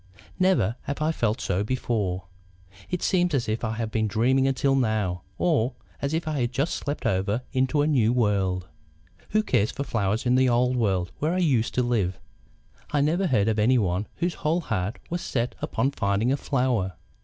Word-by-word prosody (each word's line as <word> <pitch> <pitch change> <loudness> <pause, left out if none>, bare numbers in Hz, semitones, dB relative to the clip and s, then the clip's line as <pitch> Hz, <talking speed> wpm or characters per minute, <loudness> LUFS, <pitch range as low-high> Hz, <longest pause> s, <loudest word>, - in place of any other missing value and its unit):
Never 185 - +2
have 140 - -3
I 155 +1 +1
felt 115 -6 0
so 95 -3 0
before. 105 -6 -1 0.7
It 180 - -2
seems 180 -4 +2
as 120 -4 0
if 110 +2 -2
I 110 -1 -1
had 110 -1 -3
been 110 -1 +1
dreaming 130 +6 +2
until 135 +1 +2
now 110 -9 0 0.2
or 135 -8 +1 0.3
as 140 - -1
if 160 0 -2
I 155 -2 -1
had 120 -1 0
just 140 +6 0
slept 145 +1 -4
over 100 +5 0
into 130 +2 +2
a - - +1
new 120 -7 +3
world. 100 -6 +1 0.6
"Who 215 0 +2
cared 105 - +2
for 140 - -4
flowers 110 -1 -1
in 125 - +3
the 130 0 +4
old 125 +1 +2
world 95 -7 0
where 160 +4 0
I - - 0
used 135 -11 +1
to 125 - +2
live? 105 -7 0 0.7
I 145 - +1
never 170 +6 +2
heard 110 -8 +2
of 110 -1 +1
anyone 105 -4 +2
whose 175 0 -1
whole 165 +3 +1
heart 110 - -2
was 175 0 -1
set 120 -1 -2
upon 135 - 0
finding 105 0 0
a 140 - +2
flower. 125 -10 0
120 Hz, 190 wpm, -25 LUFS, 105-140 Hz, 0.7 s, the